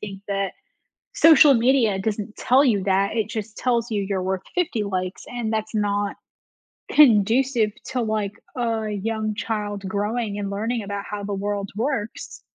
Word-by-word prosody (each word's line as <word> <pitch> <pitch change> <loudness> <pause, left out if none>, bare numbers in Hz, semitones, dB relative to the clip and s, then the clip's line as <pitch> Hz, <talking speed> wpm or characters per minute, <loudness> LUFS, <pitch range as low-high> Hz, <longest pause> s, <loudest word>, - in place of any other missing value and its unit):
think 195 -2 -8
that 195 -1 -1 0.6
social 305 -3 +7
media 235 -4 +3
doesn't 215 +1 -3
tell 260 +3 +4
you 210 -7 +2
that, 195 +2 +1
it 220 -2 0
just 220 -1 -5
tells 235 -2 0
you 205 -2 0
you're 190 -1 -2
worth 190 0 -1
50 325 -12 0
likes, 185 -2 -3
and 240 -3 -3
that's 220 0 -3
not 205 -1 0 0.8
conducive 235 -2 +4
to, 260 -1 -2
like, 215 -3 -1 0.3
a 225 -3 -1
young 215 +1 -2
child 205 -2 -3
growing 205 +2 -2
and 200 -1 -3
learning 220 +3 -2
about 200 0 -4
how 205 -1 -4
the 200 0 -3
world 200 0 -3
works. 230 -1 -3
215 Hz, 160 wpm, -23 LUFS, 200-230 Hz, 0.8 s, social